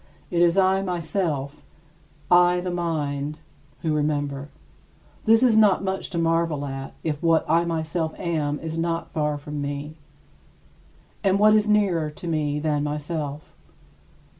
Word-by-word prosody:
It 170 - +1
is 175 +1 +4
I 190 0 +4
myself 165 -6 -2 0.7
I, 175 0 +5
the 180 0 -3
mind 150 -4 -2 0.5
who 160 -2 +1
remember. 145 -2 -1 0.8
This 225 +2 +5
is 240 -4 +5
not 210 -3 +5
much 190 0 -2
to 175 - -4
marvel 165 -3 +1
at, 135 -1 -6
if 150 -2 -2
what 165 -1 +3
I 165 +2 +3
myself 160 0 -2
am 155 -4 -1
is 160 0 -4
not 165 0 -2
far 150 -1 -1
from 145 0 -6
me. 145 +1 -4 1.3
And 195 -1 +3
what 215 +1 +6
is 215 0 +3
nearer 190 -7 +2
to 150 +3 -9
me 150 -3 0
than 150 -1 0
myself? 150 0 -4
160 Hz, 140 wpm, -24 LUFS, 150-175 Hz, 1.3 s, what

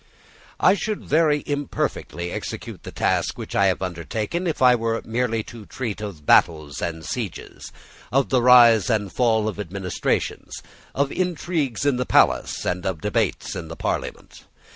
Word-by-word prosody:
I 185 - +5
should 205 +2 -3
very 150 -1 +2
imperfectly 105 - -3
execute - - -6
the - - -9
task - - 0
which - - -7
I 100 - +4
have 95 0 0
undertaken 105 - -3
if 160 - -2
I 125 -1 +6
were 115 -1 0
merely 115 -1 -1
to 115 -2 -11
treat 115 -5 -5
of 95 -8 -7
battles 75 -4 +3
and 80 -2 -4
sieges, - - -6 0.4
of 135 +1 +2
the 130 -2 +3
rise 120 -4 +7
and 105 -4 0
fall 110 -3 +2
of 105 - -4
administrations, 95 -1 -3 0.3
of 140 0 +1
intrigues 165 - -2
in 140 -3 +2
the 125 - -2
palace, - - +2
and 90 0 -1
of 95 -4 -2
debates - - -1
in 85 - -6
the 80 - -8
parliament. - - -5
115 Hz, 160 wpm, -23 LUFS, 95-135 Hz, 0.4 s, rise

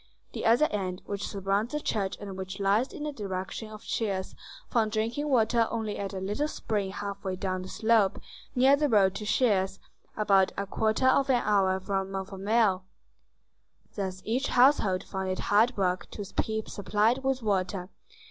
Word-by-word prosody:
The - - -2
other 235 +7 +5
end, 185 -3 -3
which 200 0 -4
surrounds 200 +5 -1
the 300 - 0
church 200 -9 -2
and 200 -2 -7
which 190 +1 -6
lies 200 +6 +2
in 330 -6 -7
the 300 - -2
direction 200 -2 -5
of 215 0 -10
Chelles, 195 -4 -2 0.3
found 220 -3 +1
drinking 230 +7 -1
water 230 -2 +3
only 220 -2 -3
at 200 -1 -3
a 195 - -5
little 205 +10 -1
spring 210 -9 -2
half 200 0 -6
way 190 -2 -2
down 185 0 -2
the 185 - -7
slope, 220 -2 +2 0.4
near 265 +2 +6
the 295 0 +1
road 195 -5 +4
to 210 +2 -6
Chelles, 195 -6 +2 0.4
about 195 -3 +3
a 200 - -1
quarter 220 +5 0
of 270 +1 +4
an 245 -2 +3
hour 195 -2 +3
from 195 0 -2
Montfermeil. 195 +1 0 1.1
Thus 190 -2 -4
each 250 +6 0
household 245 -8 +4
found 190 -1 -4
it 185 - -1 0.2
hard 225 +4 +4
work 185 -2 0
to 205 - -5
keep 220 0 -1
supplied 215 +6 +1
with 265 -2 0
water. 190 -2 -1
205 Hz, 175 wpm, -28 LUFS, 190-230 Hz, 1.1 s, near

